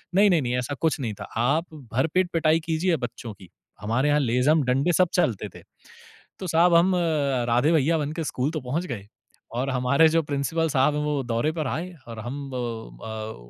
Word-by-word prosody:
नहीं, 205 +1 +6
नहीं, 170 -5 +3
नहीं, 125 -1 -1
ऐसा 125 +3 -3
कुछ 150 - -1
नहीं 115 -5 -3
था। - - -3 0.2
आप 160 +6 +1 0.3
भर 130 +6 +2
पेट 185 -1 +2
पिटाई 160 0 +3
कीजिए 165 +1 +1
बच्चों 115 -2 -8
की। 95 -3 -16 0.3
हमारे 120 +7 +1
यहाँ 150 0 +3
लेज़म, 135 +4 +2
डंडे, 135 +7 +1
सब 180 - +3
चलते 120 - 0
थे। - - -12 0.8
तो 185 - -5
साहब, 170 +1 +4
हम 180 +2 +4 0.5
राधे 125 +7 +3
भैया 160 +2 +3
बन 150 -1 -2
के - - -1
स्कूल 140 +1 -2
तो 155 -4 -4
पहुँच 145 +8 -2
गए, 105 -6 -6 0.5
और 135 +2 -1
हमारे 135 +5 +3
जो 165 +1 +2
प्रिंसिपल 150 +3 -1
साहब 135 +2 +2
हैं, 150 - -1
वो 150 -2 0
दौरे 120 +6 0
पर 155 -5 -2
आए, 175 +6 -3 0.2
और 115 -1 -8
हम 135 +4 -6
ब 110 - -6
140 Hz, 200 wpm, -25 LUFS, 120-160 Hz, 0.8 s, नहीं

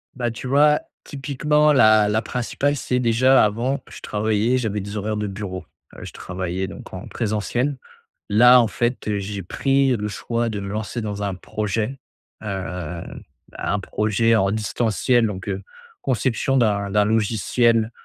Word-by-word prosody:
Bah, 120 -2 -1
tu 115 +3 -7
vois, 150 +3 +4 0.2
typiquement 150 +2 +1
la 110 -5 +5
la 110 +2 +1
principale 125 +5 -1
c'est 125 -2 -1
déjà, 125 +2 +4
avant, 125 +6 -1
je - - -11
travaillais, 110 +4 0
j'avais 105 -4 -2
des 100 +2 -6
horaires 105 +1 -2
de 105 - -2
bureau, 95 -2 -6 0.3
heu, - - -10
je - - -8
travaillais 95 +1 -4
donc - - -11
en - - -7
présentiel. 120 +5 -1 0.5
Là, 125 +4 +7
en 115 - +1
fait, 120 +1 -2
heu, 105 -1 0
j'ai 100 -1 -5
pris 135 +5 +1
le 105 0 -3
choix 115 +2 -2
de 105 -2 -4
me 100 - -5
lancer 110 +3 -4
dans 105 -1 -4
un 100 -2 -2
projet, 110 +6 -3 0.4
hem, 90 -5 -5 0.4
un 105 - -1
projet 105 +3 +1
en 100 -3 +2
distanciel. 115 +2 +1
Donc, 95 -2 -6
heu, 95 0 -3 0.4
conception 130 +2 0
d'un 100 -4 +1
d'un 105 0 +3
logiciel, 115 +1 +2
110 Hz, 160 wpm, -22 LUFS, 100-125 Hz, 0.5 s, Là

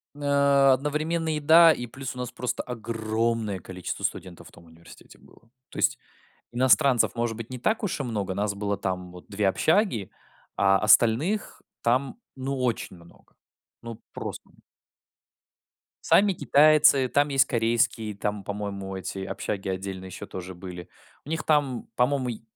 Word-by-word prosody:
А, 140 -1 +4
одновременно 155 +4 -1
еда, 160 +3 +7
и 120 -5 -3
плюс 130 +2 -7
у - - -11
нас 125 -1 -4
просто 125 -1 -3
огромное 115 -2 -2
количество 90 +1 -7
студентов 90 -2 -5
в - - -16
том 85 - -17
университете 85 +1 -17
было. 115 - -22 0.2
То - - -12
есть, - - +2 0.6
иностранцев, 130 +1 +3
может 115 -2 -2
быть, 115 0 -8
не 130 - -6
так 220 - 0
уж 195 -7 -2
и - - +1
много. 105 -7 -3
Нас 100 +1 -1
было 100 0 -2
там 90 -2 -4
вот 90 - -13
2 100 -1 0
общаги, 155 - +1 0.5
а 95 0 +4
остальных 120 - +2 0.2
там, 130 - 0 0.2
ну, 135 +1 -3
очень 115 -6 -2
много. 85 0 -20 0.5
Ну, 115 -2 -8
прост - - -5 1.7
Сами 200 0 +4
китайцы, 150 -4 +5
там 145 +2 +2
есть 135 -2 +4
корейские, 115 -2 0
там, 105 0 -3
по-моему, 100 -1 -5
эти 95 +1 -6
общаги 100 0 -4
отдельно 95 0 -5
еще 95 - -8
тоже 95 0 -8
были. 90 -1 -9 0.4
У - - -10
них 160 -1 -2
там, 145 -5 0
по-моему, 130 +1 +1
й 115 - -6
115 Hz, 150 wpm, -26 LUFS, 100-140 Hz, 1.7 s, еда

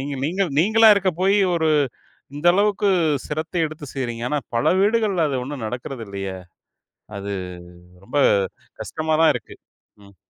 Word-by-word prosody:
நீங்க 140 +1 -4
நீங்கள் 185 +2 -1
நீங்களா 220 +5 +5
இருக்கப்போயி 190 +1 +1 0.2
ஒரு, 160 -2 +1 0.7
இந்த 145 +4 -3
அளவுக்கு 205 +1 +2 0.4
சிரத்த 155 +4 -5
எடுத்து 155 -1 -9
செய்றீங்க. 120 -4 -4
ஆனா, 150 - +1 0.2
பல 115 - 0
வீடுகள்ல 205 -5 +2
அது 135 - -2
ஒண்ணும் 135 -3 -6
நடக்கிறதில்லையே! 110 -6 -6 0.8
அது 100 0 -5 0.7
ரொம்ப 145 - -2 0.6
கஷ்டமா 155 0 -2
தான் 165 - +6
இருக்கு. 125 - -7 0.5
ம். 100 -1 -19
155 Hz, 130 wpm, -22 LUFS, 125-190 Hz, 0.8 s, தான்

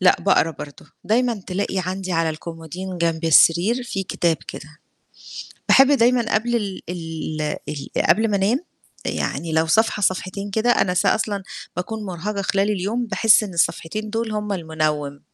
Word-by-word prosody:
لأ 185 - +5
باقرا 190 -4 +3
برضو، 145 -2 -10 0.2
دايمًا 230 -1 +1
تلاقي 190 +1 -2
عندي 185 0 -3
على 165 -1 +1
الكومودين 170 +3 -7
جنب 165 -1 0
السرير 175 +9 +5
في 195 -5 -3
كتاب 170 -3 0
كده. 155 +1 -9 0.9
باحب 270 - +7
دايمًا 240 -3 +3
قبل 240 +2 +1
ال 200 -4 -4
ال 165 -2 -5 0.3
ال 145 -2 -6 0.2
قبل 220 +4 +4
ما 200 - +2
أنام، 215 +9 +1 0.5
يعني 165 -1 -2
لو 160 +1 +2
صفحة 220 +5 +2
صفحتين 190 +2 -1
كده، 220 +4 +1
أنا 180 -6 +2
ص 180 - +1
أصلًا 205 -3 +1 0.3
باكون 215 +4 -4
مرهقة 195 +2 -4
خلال 195 +2 +1
اليوم 210 +5 -1
باحس 220 0 +4
إن 190 -4 -6
الصفحتين 170 +6 -1
دول 225 0 -2
هُم 210 -1 -2
المنوم. 155 -4 -2
190 Hz, 155 wpm, -22 LUFS, 165-215 Hz, 0.9 s, باحب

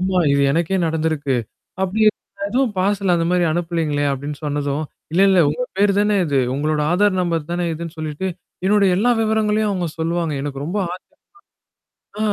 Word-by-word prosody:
ஆமா 185 0 +1
இது 140 - +3
எனக்கே 170 +4 +1
நடந்துருக்கு. 155 -4 0 0.5
அப்பிடி 210 +4 +1 0.4
எதுவும் 245 -2 0
பார்சல் 195 -1 +1
அந்தமாரி 175 +1 +1
அனுப்பலேங்களே! 165 -3 -1
அப்பிடின்னு 140 +2 -4
சொன்னதும், 145 0 -1 0.3
இல்ல, 180 - +2
இல்ல 190 - +4
உங்க 150 +12 -2 0.2
பேரு 200 0 +4
தானே 210 0 +2
இது. 145 -4 +1 0.2
உங்களோட 150 +2 0
ஆதார் 200 +1 +3
நம்பர் 165 -3 -1
தானே 175 0 -1
இதுன்னு 165 0 -6
சொல்லிட்டு, 155 +4 -4 0.4
என்னோட 205 +1 +4
எல்லா 240 +5 +2
விவரங்களையும் 215 -1 +1
அவுங்க 180 -4 -1
சொல்லுவாங்க. 165 -1 -1
எனக்கு 140 -1 -4
ரொம்ப 175 +6 -3 1.2
ஆச்சர்யம் 215 0 -4
175 Hz, 150 wpm, -20 LUFS, 155-200 Hz, 1.2 s, இல்ல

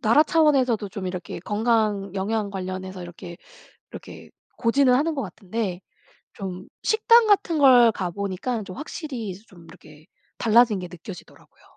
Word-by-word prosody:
나라 245 +5 +5
차원에서도 270 -10 +2
좀 195 -2 -6
이렇게 180 -2 -6
건강 210 -1 0
영양 205 +2 -2
관련해서 185 -1 -6
이렇게 175 0 -10 0.5
이렇게 - - -11 0.3
고지는 250 +2 +3
하는 310 +4 +1
것 275 - -2
같은데 190 0 -5 0.5
좀 185 -2 -7 0.2
식당 460 +1 +4
같은 390 -5 +2
걸 250 -4 +7
가 185 -4 -4
보니까 200 +5 -3
좀 185 -2 -9
확실히 285 -7 -6
이제 185 +1 -8
좀 175 -5 -17
이렇게 155 -1 -16 0.3
달라진 225 -2 +4
게 180 - -6
느껴지더라고요. 180 +1 -13
210 Hz, 330 characters per minute, -24 LUFS, 185-250 Hz, 0.5 s, 걸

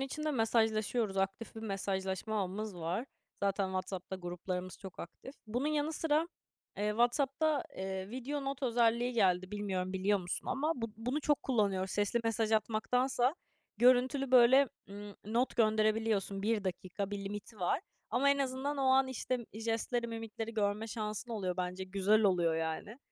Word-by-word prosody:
içinde 305 +3 -2
mesajlaşıyoruz, 225 -3 +1
aktif 195 +4 -2
bir - - -5
mesajlaşma 195 0 -2
ağımız 200 +2 -3
var. 175 +9 -2 0.4
Zaten 195 0 +1
WhatsApp'ta 185 0 -4
gruplarımız 180 0 -5
çok 190 -2 -10
aktif. 260 +10 -9
Bunun 245 +6 -1
yanı 305 +1 0
sıra, 315 +1 +1 0.5
eee, 210 +1 0
WhatsApp'ta, 275 +6 +2
eee, 190 +1 -4
video 275 +3 -4
not 275 0 -3
özelliği 240 0 +2
geldi. 185 -4 +2
Bilmiyorum 195 -3 -2
biliyor 195 +2 +2
musun 175 -1 -4
ama 300 +4 +1
bu 230 -3 -4
bunu 250 +7 -2
çok 295 -1 +1
kullanıyoruz. 200 -6 +1
Sesli 205 +3 +1
mesaj 225 -1 +1
atmaktansa 245 +4 +2 0.4
görüntülü 255 +3 +4
böyle, 255 +2 +7 0.2
ımm, 205 +1 -8
not 235 +5 0
gönderebiliyorsun. 215 -3 +2
1 215 -1 +1
dakika 190 +2 -3
bir 205 - -3
limiti 205 +1 -7
var 175 - +1 0.3
ama 280 +3 +3
en 280 - +3
azından 270 +2 -1
o - - +1
an, 265 0 +4
işte, 255 0 -2 0.2
jestleri, 230 +2 -1
mimikleri 225 0 -5
görme 210 +1 0
şansın 215 +1 -4
oluyor 190 -5 -2
bence, 180 +1 -3
güzel 200 +3 +3
oluyor 175 -5 +3
yani. 165 +9 -3
220 Hz, 150 wpm, -33 LUFS, 195-250 Hz, 0.5 s, böyle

